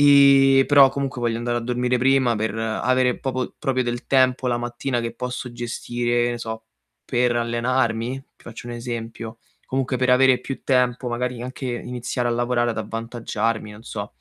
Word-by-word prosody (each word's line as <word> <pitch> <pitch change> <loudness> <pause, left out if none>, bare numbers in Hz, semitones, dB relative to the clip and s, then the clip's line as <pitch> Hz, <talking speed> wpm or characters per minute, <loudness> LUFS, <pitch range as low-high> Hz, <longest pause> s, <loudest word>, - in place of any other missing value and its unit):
E 140 -1 +7
però 140 -2 +8
comunque 135 -2 -3
voglio 115 -1 0
andare 120 0 -1
a - - -4
dormire 125 +1 0
prima, 130 -2 +3
per 110 0 -2
avere 125 +3 +1
popo 130 -1 -3
proprio 130 -4 0
del 120 0 -4
tempo 130 -1 +3
la 120 -1 +1
mattina 120 +1 -2
che 115 0 -4
posso 125 0 -5
gestire 120 0 -1
e - - -1
ne 120 - -4
so, 110 -1 -6 0.4
per 125 0 +1
allenarmi? 120 +1 0 0.2
Ti - - -23
faccio 120 0 -9
un - - -5
esempio. 115 -1 -6 0.3
Comunque 130 0 -1
per 125 0 +1
avere 130 0 +5
più 135 - -6
tempo, 125 -1 +1
magari 120 0 -3
anche 130 +1 -6
iniziare 125 0 -3
a - - 0
lavorare, 120 0 +1
ad 115 - -4
avvantaggiarmi, 115 0 -3
non 105 +2 -13
so. 105 -1 -6
120 Hz, 175 wpm, -23 LUFS, 120-130 Hz, 0.4 s, però